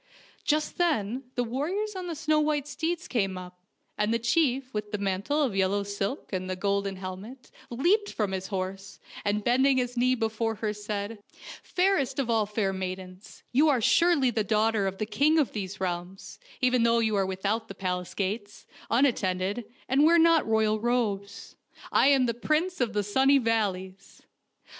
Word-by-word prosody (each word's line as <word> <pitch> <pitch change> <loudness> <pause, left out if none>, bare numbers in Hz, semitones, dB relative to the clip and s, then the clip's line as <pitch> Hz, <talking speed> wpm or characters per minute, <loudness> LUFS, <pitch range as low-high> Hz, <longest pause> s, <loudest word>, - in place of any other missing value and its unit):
Just 305 +2 0
then 255 - 0
the 245 - +1
warriors 350 - -2
on 365 -1 -5
the 335 - -4
snow 310 0 +1
white 300 -2 0
steeds 325 +4 -3
came 195 -6 -1
up, 180 0 -10 0.4
and 210 +1 +1
the 230 - +2
chief 260 +2 +1
with 210 -1 -4
the 210 - -1
mantle 200 +10 0
of 240 -8 -1
yellow 195 +1 +1
silk 200 +5 -4
and 185 0 -3
the 185 - -1
golden 200 0 -1
helmet 190 +7 -9 0.2
leaped 365 - +1
from 210 -3 -1
his 190 0 -3
horse, 195 0 -5 0.2
and 205 +1 0
bending 260 +3 +3
his 245 -1 -1
knee 250 +1 +3
be 225 -2 0
fore 225 0 -2
her, 215 0 -2
said: 210 +1 -5 0.2
" - - -12
Fairest 365 -8 +1
of 260 -4 0
all 220 -2 +2
fair 210 -2 -1
maidens, 185 0 -7
you 295 +5 +4
are 270 -4 +3
surely 290 +1 +3
the 220 -2 0
daughter 215 -1 +1
of 190 0 -4
the 215 - -2
king 295 +8 +2
of 300 -5 +2
these 195 -2 -5
realms, 180 +1 -5 0.2
even 250 -1 +3
though 235 0 +4
you 220 -2 +1
are 195 -1 +1
without 200 +4 -2
the 195 - -9
palace 180 -1 -3
gates, 205 +1 -4 0.2
unat 250 +2 +3
tended, 190 +4 -2 0.2
and 270 +3 +3
wear 335 +2 +6
not 330 -3 +4
royal 220 -1 +2
robes. 215 -4 -2 0.4
I - - +4
am 275 -2 +5
the 235 - 0
Prince 310 +8 -1
of 230 -3 0
the 205 0 0
Sunny 265 +7 +4
Valleys." 195 -6 -2
225 Hz, 185 wpm, -27 LUFS, 195-270 Hz, 0.4 s, wear